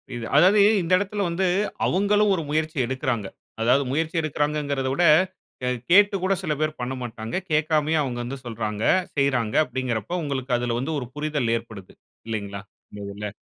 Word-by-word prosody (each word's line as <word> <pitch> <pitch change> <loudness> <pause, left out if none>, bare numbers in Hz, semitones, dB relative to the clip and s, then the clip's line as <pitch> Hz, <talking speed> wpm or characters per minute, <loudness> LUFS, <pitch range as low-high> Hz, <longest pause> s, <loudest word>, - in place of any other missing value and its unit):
இது 120 -1 -5
அதாவது 185 +8 +6 0.2
இந்த 170 +1 -4
இடத்தில 205 +1 -2
வந்து 185 +3 0 0.4
அவுங்களும் 205 +2 +2
ஒரு 165 - -3
முயற்சி 155 +1 -1
எடுக்கிறாங்க. 130 -4 -2 0.3
அதாவது 125 +5 +3
முயற்சி 160 +4 -1
எடுக்கிறாங்கங்கிறத 145 -3 -1
விட 175 - +1 0.6
க - - -10 0.3
கேட்டு 200 +2 +6
கூட 190 +1 +2
சில 155 -4 0
பேர் 155 0 -1
பண்ணமாட்டாங்க. 120 -3 -5 0.2
கேட்காமயே 155 0 +2
அவங்க 125 -3 -4
வந்து 130 +3 -5
சொல்றாங்க 110 -2 -4 0.3
செய்றாங்க 125 -6 +1
அப்டின்கிறப்ப 130 - -3
உங்களுக்கு 135 -3 -1
அதில 120 -1 -1
வந்து 145 +6 -2
ஒரு 125 - -6
புரிதல் 150 -6 -1
ஏற்படுது 110 -5 -11 0.3
இல்லைங்களா? 100 -3 -4 0.3
இந்த 105 - -9
இதுல. 105 +1 -5
140 Hz, 150 wpm, -24 LUFS, 120-160 Hz, 0.6 s, அதாவது